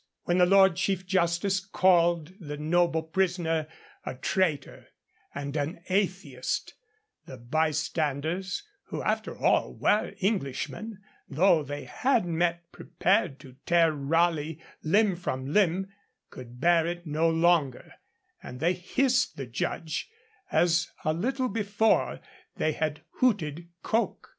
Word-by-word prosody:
When 175 +1 +1
the 180 - +6
Lord 190 -2 +5
Chief 190 -1 -1
Justice 185 +1 +1
called 175 -3 +2
the 150 -5 -7
noble 160 +1 +1
prisoner 165 -2 0 0.4
a - - -5
traitor 150 +1 -1 0.5
and 140 0 -5
an 160 +4 -3
atheist, 185 -9 -1 0.5
the 130 - -9
bystanders, 155 - -1 0.2
who - - -5
after - - -2
all - - +1
were 210 - +1
Englishmen, 195 - -3 0.3
though 165 +3 +4
they 145 0 -6
had 250 -6 +1
met 170 0 -1
prepared 185 -7 0
to 130 -3 -14
tear 170 -1 +4
Raleigh 160 +1 0 0.2
limb 200 +4 +3
from 135 -4 -4
limb, 195 -1 +2 0.4
could 125 -1 -11
bear 170 +2 +3
it 175 0 -5
no 160 +2 +1
longer, 165 -5 +1 0.5
and 125 - -9
they 170 +5 +2
hissed 250 +8 0
the 135 - -4
judge, 155 - -3 0.4
as 175 0 +2 0.2
a 155 - +2
little 255 - -1
before 215 0 +1 0.3
they 155 - 0
had 155 -1 -3
hooted 170 - 0
Coke. 230 +1 -1
170 Hz, 125 wpm, -28 LUFS, 150-190 Hz, 0.5 s, the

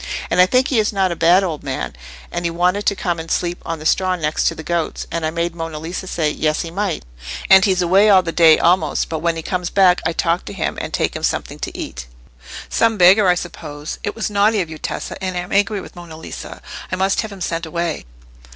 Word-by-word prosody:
And 180 - +5
I 180 - +6
think 255 +5 +2
he 250 - +2
is 215 - +1
not 190 -3 +1
a - - -2
bad 175 +4 +4
old 165 -5 -3
man, 135 - -4 0.4
and 175 0 -3
he 170 - 0
wanted 180 +4 0
to 200 - +3
come 175 -3 -2
and 160 0 -7
sleep 175 0 -1
on 165 - -4
the 155 - -10
straw 185 +3 +2
next 155 -3 -1
to - - 0
the 160 - -8
goats, 170 0 -2
and 165 0 -2
I 155 - +1
made 170 +1 -2
Monna 165 -2 -5
Lisa 170 +4 -6
say, 155 -4 0
'Yes, 155 0 0
he 165 - -7
might,' 195 -1 -2 0.5
and 190 0 +9
he's 185 -3 +2
away 195 +5 +4
all 190 -2 +6
the 165 - -3
day 165 -2 +6
almost, 180 +3 +2
but 160 - -3
when 170 +1 0
he 165 - -5
comes 180 0 -2
back 185 -2 +4
I 165 - 0
talk 170 +1 0
to - - -7
him, - - -2
and - - -5
take - - -1
him - - -4
something - - -2
to - - -5
eat." 60 -1 -6 0.6
"Some 230 -1 +1
beggar, 190 +3 +6
I 180 - +5
suppose. 150 -4 -7
It 205 - -3
was 220 -2 -3
naughty 205 +1 +3
of 170 -4 -2
you, 155 - -8
Tessa, - - -5
and 185 -1 -2
I - - 0
am 180 - -10
angry 205 +1 +2
with 190 - -11
Monna 170 -2 -10
Lisa. 160 - -9 0.3
I - - 0
must 190 +1 +1
have 220 -2 -6
him 200 - -10
sent 165 -2 -3
away." 170 - -3
175 Hz, 250 wpm, -19 LUFS, 165-190 Hz, 0.6 s, and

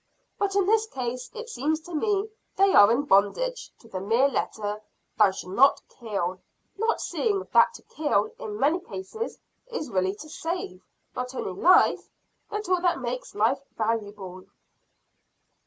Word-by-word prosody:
But 395 -1 0
in 395 -2 +3
this 440 +2 +3
case, 250 - -4
it 460 +1 -6
seems 310 - -1
to 350 +2 -11
me, 405 +5 0 0.3
they 390 0 +4
are 205 +2 +8
in 250 +5 +2
bondage 295 - +1
to 230 - -17
the 195 -4 -5
mere 230 +7 +3
letter 210 -5 -3 0.3
'thou 210 -2 +6
shalt 185 -1 -7
not 270 +6 +5
kill;' 190 -6 -4 0.3
not 450 +2 0
seeing 405 -4 -1
that - - +5
to - - -12
kill, 315 +8 0
in 430 -4 -6
many 310 +6 +3
cases, 380 +5 -6 0.3
is 460 - -5
really 190 0 0
to 310 - -10
save, 320 - -5 0.3
not 250 +1 -4
only 195 - -3
life, 340 - +4 0.4
but 420 -1 -4
all 365 -1 +2
that 350 -4 +2
makes 250 0 -5
life 230 +6 +2 0.2
valuable." 205 -4 -3
275 Hz, 155 wpm, -26 LUFS, -, 0.4 s, are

